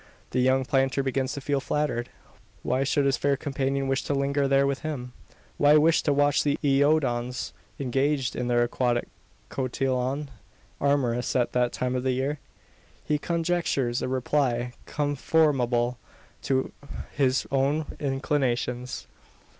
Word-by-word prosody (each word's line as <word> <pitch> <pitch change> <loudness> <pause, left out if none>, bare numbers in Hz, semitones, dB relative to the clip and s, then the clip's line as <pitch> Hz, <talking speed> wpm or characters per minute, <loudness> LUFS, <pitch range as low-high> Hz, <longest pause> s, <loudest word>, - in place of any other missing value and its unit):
The 130 - 0
young 130 +1 +3
planter 135 0 +1
begins 130 0 -1
to 140 - -5
feel 140 0 0
flattered. 135 -4 -1 0.5
Why 130 +2 +1
should 140 +1 +1
his 135 -2 +2
fair 140 -1 +1
companion 135 -1 -1
wish 135 0 +1
to 145 - 0
linger 140 0 +1
there 135 0 +4
with 140 -1 -1
him? 130 -6 -5 0.4
Why 145 +1 +6
wish 160 +2 +4
to 150 - +1
watch 145 0 +3
the 145 -1 +1
iodons, 135 -4 +1 0.3
engaged 135 +1 0
in 125 - -2
their 120 0 +3
aquatic 120 0 0 0.4
cotillon 130 +2 -1 0.5
amorous 130 -4 +1
at 125 -2 +2
that 125 -1 +1
time 125 0 -2
of 125 - 0
the 130 0 0
year? 135 +3 -1 0.7
He 150 -1 +1
conjectures 165 -8 0
a - - -1
reply 125 -2 0
conformable 135 -4 +1 0.4
to 130 -1 0 0.4
his 135 -2 +1
own 140 +3 +1
inclinations. 130 -3 -1
135 Hz, 140 wpm, -26 LUFS, 125-145 Hz, 0.7 s, Why